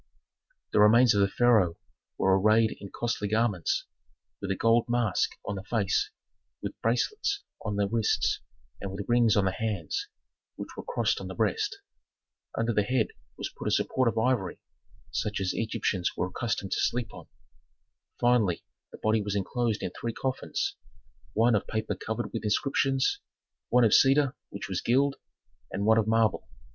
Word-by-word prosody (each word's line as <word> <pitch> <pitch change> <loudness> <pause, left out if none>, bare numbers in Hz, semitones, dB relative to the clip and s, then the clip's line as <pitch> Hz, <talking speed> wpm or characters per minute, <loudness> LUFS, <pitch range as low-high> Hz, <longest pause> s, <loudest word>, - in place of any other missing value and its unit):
The - - +4
remains 115 +3 +7
of 100 - +3
the 100 - +4
pharaoh 105 -6 +3 0.4
were 95 0 +3
arrayed 110 +2 +4
in 100 - -8
costly 115 -2 -2
garments, 110 -4 0 0.6
with 100 - -4
a 95 - +1
gold 115 +3 +3
mask 120 -5 +1
on 100 - -2
the 95 -1 -5
face, 105 -4 +1 0.5
with - - -5
bracelets 405 - 0 0.2
on 105 -2 -2
the 100 0 +1
wrists, 110 +1 +1 0.4
and 100 - -4
with 100 +1 -5
rings 120 -3 +4
on 100 - +3
the 95 - +2
hands, 110 - -3 0.5
which - - -7
were - - -5
crossed 485 - -1
on - - -6
the - - -7
breast. 415 -2 -1 0.8
Under 115 +1 +1
the 105 - +3
head 110 +2 +1 0.3
was - - -5
put - - -5
a - - +3
support 130 -1 +1
of 115 - 0
ivory, 110 -6 +1 0.5
such 105 -1 -2
as 95 -1 -1
Egyptians 105 -4 -1
were 90 - -1
accustomed 115 -1 -3
to - - 0
sleep 120 -3 -1
on. - - -11 0.9
Finally 120 -8 +2 0.3
the - - -10
body 110 0 +1
was 100 0 -3
inclosed 110 +3 -1
in 90 - -2
three 115 +4 -4
coffins: 130 +2 -2 0.6
one 115 +3 +4
of 105 - +1
paper 110 0 -2
covered 110 +2 -4
with 115 - -3
inscriptions, 135 +4 +1 0.5
one 125 0 +5
of 110 - +4
cedar 135 0 +5
which 100 - -6
was 95 -1 -2
gilt, 135 +3 +2 0.5
and 100 +2 -2
one 110 +1 +5
of 110 - 0
marble. 110 -2 +2
110 Hz, 170 wpm, -28 LUFS, 100-120 Hz, 0.9 s, remains